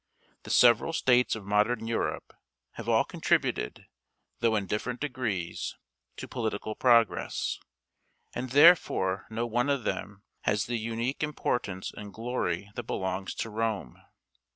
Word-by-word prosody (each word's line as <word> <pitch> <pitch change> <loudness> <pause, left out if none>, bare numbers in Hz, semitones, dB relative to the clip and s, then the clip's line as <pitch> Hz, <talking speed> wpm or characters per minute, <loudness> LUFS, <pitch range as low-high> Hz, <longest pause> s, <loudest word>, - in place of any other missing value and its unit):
The - - -11
several 120 +6 +5
states 125 -6 +3
of 110 -3 -8
modern 105 +3 +1
Europe 115 0 -2 0.4
have - - -7
all - - +4
contributed, - - -1 0.5
though 115 -1 +2
in 100 -2 0
different 115 +6 -3
degrees, 110 -12 -3 0.4
to - - -6
political 110 -2 -3
progress, 115 -1 +2 0.7
and 130 - -4
therefore 135 - +5
no 115 +2 -2
one 120 +4 0
of 140 -4 +1
them 100 0 -4 0.2
has 105 0 0
the 120 -1 -2
unique 115 +4 -2
importance 120 -10 -2
and 105 -1 -8
glory 105 -5 -3
that - - -4
belongs 95 -1 -3
to 115 - -4
Rome. 110 - -3
115 Hz, 130 wpm, -29 LUFS, 100-125 Hz, 0.7 s, several